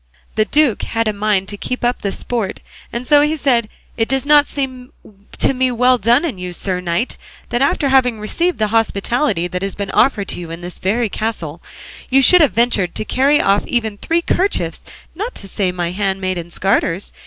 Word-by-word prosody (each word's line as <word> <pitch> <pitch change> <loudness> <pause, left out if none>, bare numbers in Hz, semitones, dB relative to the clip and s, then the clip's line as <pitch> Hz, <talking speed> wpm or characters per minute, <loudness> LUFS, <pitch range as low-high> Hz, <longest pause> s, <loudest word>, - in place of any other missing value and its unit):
The 215 - +2
duke 290 -4 +2
had 230 -1 -1
a 215 - +1
mind 200 -2 0
to 205 - -5
keep 250 +5 -4
up 245 +1 0
the 200 - -1
sport, 225 -4 -3 0.4
so 290 +3 +5
he 300 +2 +1
said, 245 -7 +1 0.3
"It 225 -1 +1
does 270 +1 0
not 295 0 +5
seem 260 -3 -4 0.5
to - - +3
me 260 0 +1
well 250 +1 +3
done 240 - +3
in 250 - -4
you, 180 -1 -5
sir 185 +1 -2
knight, 175 +6 -2 0.3
that 240 - -1
after 280 +1 +2
having 250 -4 +3
received 340 +12 -1
the 215 -1 0
hospitality 225 - +1
that 180 0 -4
has 195 -1 -3
been 200 -1 -4
offered 205 -8 +2
you 175 -2 -7
in 165 +1 -7
this 175 0 -8
very 225 +5 0
castle, 185 -7 -4 0.5
you 270 +1 +4
should 360 +5 +6
have 295 - +4
ventured 220 -6 +1
to 215 - -3
carry 280 +5 +3
off 200 +1 +2
even 225 -4 -1
three 335 +1 0
kerchiefs, 390 +4 0 0.3
not 425 +9 -5
to 195 - -9
say 190 -1 -1
my 175 -1 -3
handmaid's 185 -3 -2
garters. 190 -1 0
225 Hz, 195 wpm, -18 LUFS, 195-265 Hz, 0.5 s, should